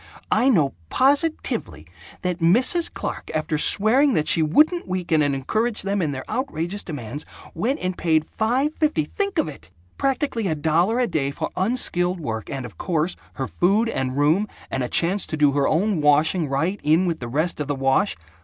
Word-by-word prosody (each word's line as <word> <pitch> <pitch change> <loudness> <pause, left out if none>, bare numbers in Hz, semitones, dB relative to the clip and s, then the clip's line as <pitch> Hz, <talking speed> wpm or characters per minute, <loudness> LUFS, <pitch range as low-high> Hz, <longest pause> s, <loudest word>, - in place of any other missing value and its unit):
I 260 - +4
know 155 - +3 0.2
positively 265 - 0 0.4
that 180 -1 -2
Mrs. 250 - +3
Clark, - - -5
after 155 0 -1
swearing 250 - +4
that 155 - 0
she 165 - +3
wouldn't 305 - +3
weaken 180 -4 0
and 145 -2 +1
encourage 215 - -1
them 200 0 -1
in 155 -4 0
their 130 -1 -6
outrageous 205 - -3
demands, 145 - -6 0.3
went 235 - -1
and 185 0 -2
paid 160 -3 +1
five 250 - 0
fifty 300 - +1
think 400 - -3
of 315 - +2
it! 150 - -10 0.3
practically 270 -5 0
a 160 - 0
dollar 165 +9 +1
a 250 - +2
day 155 -9 -1
for 140 - -4
unskilled 185 -4 0
work 110 -8 -5
and, 135 -2 -4
of 105 -9 -12
course, 165 0 0 0.2
her 135 - -3
food 205 +6 +1
and 130 - -2
room 160 +9 +2 0.2
and 135 - -1
a 125 - -2
chance 185 +4 +2
to 155 - -4
do 145 -2 +4
her 140 0 +1
own 185 +1 +1
washing 150 +3 +3
right 165 +9 -1
in 160 +5 +3
with 170 -3 -1
the 120 - -6
rest 155 +8 -1
of 150 - -3
the 145 - -1
wash. 135 +9 +1
170 Hz, 190 wpm, -23 LUFS, 150-220 Hz, 0.4 s, I